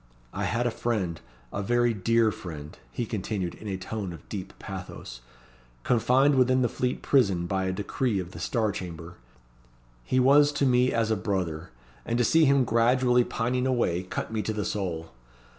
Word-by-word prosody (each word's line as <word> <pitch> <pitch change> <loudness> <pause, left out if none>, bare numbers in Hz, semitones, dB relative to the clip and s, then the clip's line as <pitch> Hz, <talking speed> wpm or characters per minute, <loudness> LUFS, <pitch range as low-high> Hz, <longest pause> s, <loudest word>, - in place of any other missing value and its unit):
I - - -2
had 120 +2 0
a 120 - +1
friend 105 -8 -2 0.3
a 100 - -2
very 120 +3 +2
dear 115 +2 +2
friend," 75 -6 -8 0.2
he 120 - -3
continued, 100 -4 -3
in 110 - -10
a 95 -2 -2
tone 95 -1 -5
of 80 - -13
deep 95 -2 -5
pathos 90 -10 -8 0.6
"confined 130 +4 +3
within 130 -1 +3
the - - +3
Fleet 125 +2 -2
Prison 100 -11 +3
by 95 +1 -1
a 95 - 0
decree 105 +4 -1
of 90 -1 -4
the - - -9
Star 110 -4 0
Chamber. 90 -3 -7 0.9
He 130 - +1
was 145 +3 +6
to 145 - +1
me 125 0 +3
as 115 -1 +1
a - - +3
brother, 90 -5 -2 0.3
and 120 - -1
to 120 - +3
see 160 +7 +4
him 140 -1 +4
gradually 125 +2 +3
pining 125 +2 -1
away 115 -9 +1
cut 95 +4 -5
me 110 - 0
to 110 +2 -2
the 105 -1 -2
soul. 85 -5 -3
110 Hz, 180 wpm, -27 LUFS, 95-125 Hz, 0.9 s, was